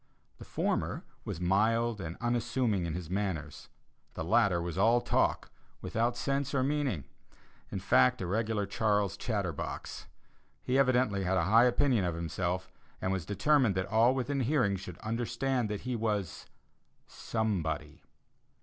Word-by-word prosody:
The - - -10
former - - -1 0.2
was - - -4
mild 110 +4 +1
and 85 0 -6
unassuming 120 -5 0
in 80 - -3
his 90 -2 -5
manners; 90 -5 -3 0.5
the - - -3
latter 100 -1 +3
was 85 -1 -4
all 115 +5 +4
talk, - - 0 0.3
without 120 +2 -1
sense 140 +1 -1
or 130 - +2
meaning 135 - 0 0.7
in - - -4
fact, 65 0 +4
a 95 - -3
regular 105 +2 0
Charles 105 -2 0
Chatterbox. 100 - -4 0.6
He 130 +2 +1
evidently 125 -7 +2
had 95 +1 +1
a 85 - +2
high 115 +6 +6
opinion 125 -3 +2
of 90 -2 -1
himself, 85 +2 -3 0.3
and 95 - -1
was 95 -4 -2
determined 125 0 +3
that 95 0 0
all 115 +4 +4
within 135 +2 -1
hearing 125 -6 +2
should 90 -2 -8
understand 120 +2 -1
that 105 -1 -3
he 125 0 -3
was 105 -6 -2 0.6
somebody. 95 -9 -3
105 Hz, 145 wpm, -31 LUFS, 95-120 Hz, 0.7 s, high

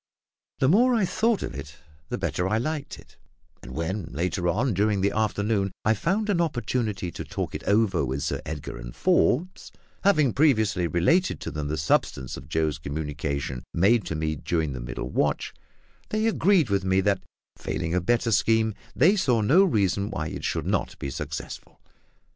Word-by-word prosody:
The 130 - +2
more 240 - +5
I 215 -4 +2
thought 225 +3 +1
of - - -5
it, 75 -1 -8 0.3
the - - -2
better 90 - -1
I 110 - +2
liked 150 +5 -3
it; - - -18 0.4
and 65 - -10
when, 90 +4 -2
later 85 +5 -2
on, 115 +7 +1
during 100 +1 +1
the 100 - +2
forenoon, 105 -2 0
I 110 - +5
found 195 - 0
an 190 -5 +2
opportunity 115 - -1
to - - -6
talk - - -4
it - - -5
over 100 -6 +2
with 65 +1 -2
Sir - - -2
Edgar 75 -4 -6
and - - -8
Forbes 180 +8 +1 0.3
having 155 - +4
previously 110 - +3
related 95 - +2
to - - -4
them 75 -2 -4
the 75 +2 -2
substance 65 -3 0
of 70 - -11
Joe's 80 -1 0
communication 70 -3 -3
made 105 +6 +4
to 80 - -3
me 80 0 -1
during 80 0 -1
the 65 - -5
middle - - -5
watch - - 0 0.6
they 215 +1 0
agreed 190 - +3
with 100 -1 +1
me 95 0 +2
that, 100 -1 +1 0.3
failing 85 -1 -3
a 90 - +2
better 115 +4 +1
scheme, 110 +2 +3 0.2
they 175 +10 +5
saw 130 - +2
no 160 - +5
reason 100 - +1
why 80 -6 -3
it - - -7
should - - -1
not - - -1
be 70 - -5
successful. - - -7
100 Hz, 180 wpm, -26 LUFS, 80-130 Hz, 0.6 s, more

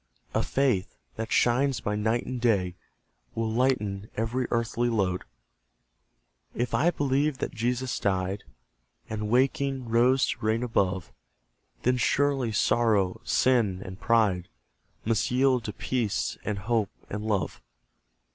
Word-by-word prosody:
A - - +2
faith, 130 -9 0 0.2
that 110 +1 -5
shines 130 +2 +3
by 105 - -2
night 110 +3 0
and 125 -2 -4
day, 100 -7 +2 0.6
Will 115 -1 -1
lighten 110 -5 0
every 120 +3 -1
earthly 115 +1 0
load. 95 -5 0 1.3
If 120 0 -2
I 165 - +4
believe 145 -2 +1
that - - -3
Jesus 125 +1 -1
died, 95 0 -1 0.7
And 105 -1 -3
waking, 135 +1 +1
rose 125 +3 +4
to - - -4
reign 110 +2 +1
above; 95 -6 0 0.7
Then 125 +1 +3
surely 135 -1 +1
Sorrow, 105 -3 +2
Sin, 110 -8 +2
and 95 0 -9
Pride, 105 -7 +2 0.6
Must 110 0 +1
yield 130 -1 +3
to 105 - -2
Peace, 105 - -1
and 105 - -2
Hope, 110 +1 0 0.2
and 105 +1 -5
Love. 105 -4 -1
115 Hz, 130 wpm, -27 LUFS, 105-125 Hz, 1.3 s, I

